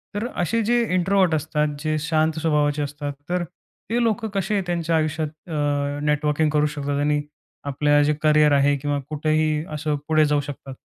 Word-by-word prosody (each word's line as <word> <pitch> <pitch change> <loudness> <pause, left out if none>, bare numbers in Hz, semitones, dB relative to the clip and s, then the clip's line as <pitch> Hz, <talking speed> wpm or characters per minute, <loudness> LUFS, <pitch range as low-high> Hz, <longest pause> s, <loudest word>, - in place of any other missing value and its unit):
तर 210 +3 -1
असे 225 +7 +1
जे 240 0 +4
इंट्रोव्हर्ट 185 -2 +2
असतात, 150 0 0
जे 155 0 -1
शांत 160 0 +1
स्वभावाचे 150 -2 +1
असतात, 145 0 -5 0.2
तर 180 0 0 0.5
ते 235 +2 +1
लोकं 225 0 0
कसे 195 +1 0
त्यांच्या 170 -2 0
आयुष्यात 155 0 0 0.2
अ, 145 -1 -1
नेटवर्किंग 150 +1 +1
करू 150 0 +2
शकतात 145 0 -2
आणि 145 0 +1 0.5
आपलं 145 +1 +3
जे 150 +1 +2
करियर 150 -1 +4
आहे, 140 0 +4
किंवा 145 +1 -2
कुठेही 155 0 0
असं, 150 0 -1
पुढे 155 -1 +4
जाऊ 145 -1 +1
शकतात? 135 -1 -8
150 Hz, 165 wpm, -23 LUFS, 145-160 Hz, 0.5 s, जे